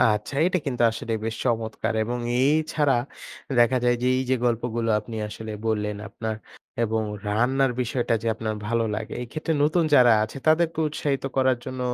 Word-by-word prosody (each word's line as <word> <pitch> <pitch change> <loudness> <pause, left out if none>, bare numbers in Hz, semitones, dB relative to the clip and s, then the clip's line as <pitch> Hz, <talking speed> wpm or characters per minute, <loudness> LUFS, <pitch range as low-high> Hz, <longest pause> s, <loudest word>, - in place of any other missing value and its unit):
আচ্ছা 105 +2 +2
এইটা 185 +1 +2
কিন্তু 125 -3 -1
আসলে 115 +1 -5
বেশ 115 0 -2
চমৎকার 115 -2 -1
এবং 120 +2 -3 0.2
এই 135 +3 +4 0.2
ছাড়া 145 -3 +3 0.7
দেখা 120 +2 +4
যায় 120 0 +3
যে - - +1
এইযে 130 0 +1
গল্পগুলো 115 -1 -1
আপনি 110 +2 -7
আসলে 110 +1 -7 0.2
বললেন 105 -1 -1
আপনার 110 +2 -4 0.5
এবং 110 0 0 0.3
রান্নার 125 +5 +2
বিষয়টা 120 0 0
যে - - -4
আপনার 110 -1 -3
ভালো 115 +1 +1
লাগে। 110 +1 -5
এই - - -6
ক্ষেত্রে 160 +1 -2
নতুন 155 +3 +3
যারা 125 -3 +7
আছে 110 - -8
তাদেরকে 160 +1 +3
উৎসাহিত 145 -2 -2
করার 130 -2 +3
জন্য 130 -1 -6
120 Hz, 170 wpm, -25 LUFS, 110-135 Hz, 0.7 s, যারা